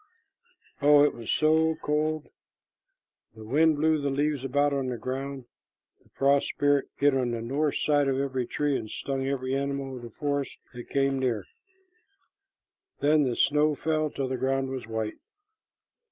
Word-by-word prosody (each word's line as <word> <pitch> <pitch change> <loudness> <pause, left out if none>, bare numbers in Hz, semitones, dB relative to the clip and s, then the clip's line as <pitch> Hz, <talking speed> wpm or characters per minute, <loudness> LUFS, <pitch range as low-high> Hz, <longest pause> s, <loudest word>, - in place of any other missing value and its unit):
Oh, 145 0 +7
it 145 - +3
was 115 -2 -5
so 160 +1 +3
cold! 155 0 -1 1.1
The 110 - -11
wind 155 +8 +3
blew 155 +1 +2
the 140 - 0
leaves 145 0 0
about 145 +2 +1
on 135 -2 -1
the 125 -1 -3
ground. 135 +1 -5 0.6
The - - -28
frost 140 +1 +2
spirit 145 -1 +1
hid 145 0 +3
on 130 -2 +1
the 120 -1 -3
north 140 +5 0
side 145 -2 +2
of 135 -1 +1
every 130 -3 -2
tree, 145 -1 0
and 110 - -4
stung 135 +4 -3
every 130 -1 -2
animal 140 -1 -2
of 125 - -8
the 120 - -8
forest 140 +3 -3 0.2
that 120 -1 -9
came 135 -1 +1
near. 115 -7 -1 1.5
Then 150 0 +3
the 125 -2 -1
snow 150 +1 +3
fell 155 0 0
till 135 -2 -3
the 130 0 -2
ground 135 +1 0
was 130 -4 -5
white. 110 -1 -4
140 Hz, 165 wpm, -27 LUFS, 130-145 Hz, 1.5 s, Oh